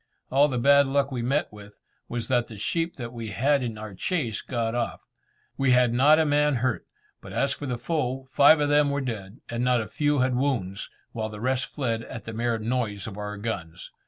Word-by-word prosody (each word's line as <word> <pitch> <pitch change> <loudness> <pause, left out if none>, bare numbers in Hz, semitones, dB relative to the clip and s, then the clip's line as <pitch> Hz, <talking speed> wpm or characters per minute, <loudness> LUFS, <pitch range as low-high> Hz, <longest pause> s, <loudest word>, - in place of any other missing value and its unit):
All 140 +3 +5
the 130 -4 -2
bad 140 +3 +5
luck 140 0 +1
we 125 -2 -2
met 135 +1 0
with, 105 0 -13 0.3
was 120 -2 -3
that 120 -2 +1
the 110 - -10
sheep 165 - -1
that 120 -2 -7
we 115 -2 -6
had 140 +7 +2
in 115 -4 -4 0.2
chase 125 - -1
got 115 -2 -2
off. 120 -1 -3 0.5
We 135 -2 +4
had 125 -1 +4
not 145 +5 +6
a 160 - +3
man 150 -1 +3
hurt, 125 -1 -1 0.3
but - - -10
as 140 0 +1
for 145 - -6
the 125 -2 -2
foe, 135 -3 -2
five 140 +4 +6
of 145 - +1
them 145 0 +4
were 140 0 -1
dead, 110 -4 -6
and 120 +1 -2
not 125 -1 +3
a 110 - -3
few 145 -1 0
had 130 -1 +2
wounds, 115 -8 -1 0.2
while 110 -1 -3
the 105 -1 -8
rest 130 +2 0
fled 115 -6 -2
at 115 -1 -8
the 110 - -6
mere 115 +1 0
noise 110 -3 -2
of 105 - -7
our 105 0 -5
guns. 90 -6 -5
125 Hz, 215 wpm, -26 LUFS, 115-140 Hz, 0.5 s, not